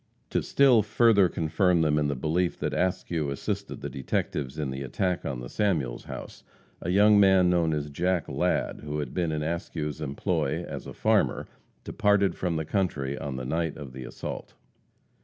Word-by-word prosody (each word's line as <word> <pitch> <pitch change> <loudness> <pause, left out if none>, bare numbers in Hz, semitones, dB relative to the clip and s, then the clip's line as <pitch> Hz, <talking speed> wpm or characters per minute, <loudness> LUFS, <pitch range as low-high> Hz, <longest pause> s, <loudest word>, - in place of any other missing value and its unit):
To - - +1
still 130 -5 +5
further 105 -2 +4
confirm 85 +2 +2
them 75 -1 +2
in 75 - +1
the 70 - -1
belief 80 +6 0
that - - -2
Askew 90 -4 -1
assisted 70 - -4
the - - -3
detectives 65 0 -2
in 75 -4 -2
the 65 +1 -5
attack 90 +7 -1
on 65 -3 -4
the - - -6
Samuels 80 - -1
house, - - -8 0.4
a 85 - -3
young 105 +3 +6
man 95 -2 +5
known 85 -2 +2
as 75 -1 -2
Jack 90 +3 0
Ladd, - - 0
who 75 0 -3
had 70 -4 -4
been 85 -3 0
in 75 -1 -2
Askew's 80 -2 -3
employ 70 -2 -1
as - - -7
a - - -7
farmer, - - +1 0.4
departed 100 -3 +2
from 90 -1 -2
the 80 -1 -2
country 75 -8 -1
on 70 -2 -5
the 65 -1 -5
night 80 +3 -1
of 70 -4 -9
the 65 0 -7
assault. - - -7
80 Hz, 180 wpm, -27 LUFS, 70-95 Hz, 0.4 s, young